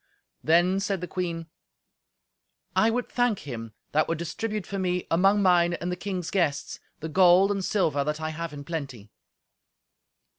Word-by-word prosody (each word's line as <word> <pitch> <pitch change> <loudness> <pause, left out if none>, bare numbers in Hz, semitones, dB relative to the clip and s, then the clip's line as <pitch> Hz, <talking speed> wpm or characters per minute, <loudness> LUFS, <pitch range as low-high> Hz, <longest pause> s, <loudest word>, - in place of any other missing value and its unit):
Then 175 +4 +3
said 195 -1 -1
the 180 - -5
queen, 170 -3 -3 1.3
"I 220 - +4
would 245 +2 -1
thank 245 -4 0
him 115 -5 -7 0.2
that 155 +1 +2
would 165 - -1
distribute 205 +5 -3
for 195 - -4
me, 180 -1 -1
among 195 +4 +4
mine 175 -2 +4
and 175 +1 -4
the - - -1
king's 180 -2 -4
guests, 155 -7 -1 0.2
the 160 - -3
gold 185 +3 +5
and 195 -1 -1
silver 160 -9 +1
that 150 +2 -2
I 155 0 -3
have 165 0 -5
in 145 -1 -8
plenty." 135 -10 -6
175 Hz, 160 wpm, -26 LUFS, 155-195 Hz, 1.3 s, gold